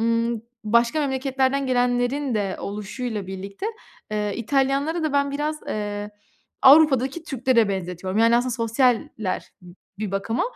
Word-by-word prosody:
ımm, 230 0 0 0.2
başka 235 +7 +3
memleketlerden 270 0 0
gelenlerin 245 +1 +1
de 200 -3 -1
oluşuyla 210 +1 -4
birlikte, 195 - -6 0.4
eee, 210 -1 -1
İtalyanları 275 +7 0
da 310 -2 -1
ben 280 0 +2
biraz, 300 +2 -2
eee, 205 0 -3 0.5
Avrupa'daki 275 +1 +5
Türklere 250 -6 +2
benzetiyorum, 185 +1 -3
yani, 230 +1 +5
aslında 250 +1 0
sosyaller 230 -3 0 0.5
bir 210 -3 -3
bakıma. 200 +4 -1
240 Hz, 120 wpm, -23 LUFS, 210-270 Hz, 0.5 s, Avrupa'daki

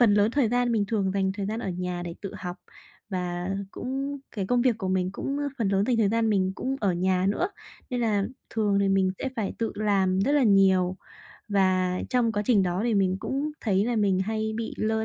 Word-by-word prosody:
phần 220 -4 +6
lớn 210 +2 +4
thời 260 -4 +2
gian 245 0 +1
mình 215 -3 +2
thường 200 -4 0
dành 190 -1 +1
thời 200 -1 -4
gian 220 +2 -3
ở - - -3
nhà 180 0 -3
để 170 -1 -5
tự 195 - -6
học. 180 -1 -5 0.5
Và 180 -1 -3 0.2
cũng 275 +3 -4
cái 195 -4 -3
công 245 +1 +2
việc 240 -4 +2
của 190 -3 -3
mình 185 0 +1
cũng, 275 +7 -3
ơ, 290 - -1
phần 220 - +1
lớn 195 0 +2
dành 245 -2 +2
thời 215 -3 +3
gian 225 0 +1
mình 190 -2 +1
cũng 265 +5 -2
ở 195 -4 +2
nhà 185 +1 +1
nữa, 345 - 0 0.4
nên 245 - -1
là 210 -4 +1 0.3
thường 205 -3 +1
thì 195 - +2
mình 190 -1 +3
sẽ 270 - -2
phải 210 -4 -1
tự 230 - -1
làm 195 -3 +1
rất 270 +8 +2
là 290 -2 +4
nhiều. 190 -3 +4 0.5
Và 185 -2 +2
trong 245 -3 +2
quá 210 -1 0
trình 215 -6 +4
đó 180 0 -1
thì 235 -2 +1
mình 190 -2 +2
cũng 280 +3 -2
thấy 200 -3 +2
là 240 0 0
mình 200 -3 +2
hay 220 +2 -1
bị 230 -1 -4
lơ 220 0 0
205 Hz, 235 wpm, -26 LUFS, 190-230 Hz, 0.5 s, phần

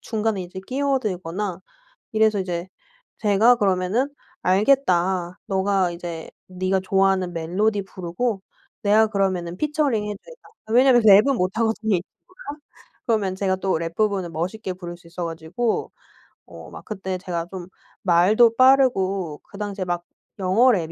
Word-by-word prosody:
중간에 220 -4 -2
이제 180 +1 -9
끼어들거나 210 -9 -2 0.5
이래서 215 -2 +3
이제 180 -1 -4 0.5
제가 220 +3 +4
그러면은 195 +6 +1 0.3
"알겠다. 185 -4 +2
너가 190 -1 +1
이제 170 -2 -7 0.2
네가 185 +1 -1
좋아하는 190 -2 +1
멜로디 200 +6 0
부르고 190 +4 -3 0.4
내가 215 +1 +4
그러면은 185 -4 -1
피처링 295 -8 0
해 210 - -3
주겠다." - - -16 0.2
왜냐면 245 0 +5
랩은 215 +6 +6
못하거든요. 220 +2 0
이 170 - -3
친구가. 295 - -12 0.5
그러면 205 -5 +1
제가 190 -1 0
또 190 0 -1
랩 165 0 -5
부분을 200 -5 0
멋있게 185 +5 -4
부를 175 -1 -8
수 170 - -21
있어 175 +1 -5
가지고 165 +8 -3 0.5
어 - - -12
막 - - -11
그때 190 -3 -4
제가 175 -2 -4
좀 180 -2 -7 0.4
말도 205 +6 +4
빠르고 195 - +3
그 200 - -14
당시에 205 -2 -4
막 175 -1 -3 0.3
영어 210 +8 +4
랩 165 -6 -1
195 Hz, 310 characters per minute, -23 LUFS, 180-220 Hz, 0.5 s, 랩은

